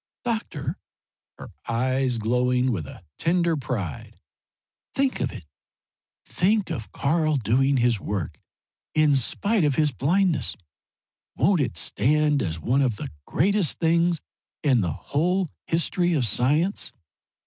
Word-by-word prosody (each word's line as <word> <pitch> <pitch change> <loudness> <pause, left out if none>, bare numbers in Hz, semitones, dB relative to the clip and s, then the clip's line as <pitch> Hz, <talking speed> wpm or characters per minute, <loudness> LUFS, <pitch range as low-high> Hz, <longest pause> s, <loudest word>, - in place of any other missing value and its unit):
"Doctor," 180 - -3 0.6
her - - -10 0.2
eyes 130 +1 0
glowing 125 +3 +1
with 85 -10 -3
a 90 - -12
tender 170 0 +2
pride 115 - -5 0.8
"think 270 -1 +1
of - - -1
it! 100 -10 -10 0.8
Think 205 +2 +1
of 110 -3 -5
Karl 155 +1 +1
doing 135 +3 +2
his 120 -3 +2
work 85 -9 -4 0.6
in 155 -2 +4
spite 200 - +1
of 145 -3 +2
his 150 0 +2
blindness! 155 - +1 0.8
Won't 175 +3 +3
it 120 -11 -2
stand 150 - +2
as 80 -2 -3
one 125 - +1
of 125 -5 +1
the - - -6 0.2
greatest 190 - +1
things 170 0 +2 0.4
in 130 -6 +3
the 85 -4 -1
whole 175 - -1 0.2
history 175 +1 +1
of 140 -6 +1
science?" 150 - +1
140 Hz, 125 wpm, -24 LUFS, 120-170 Hz, 0.8 s, in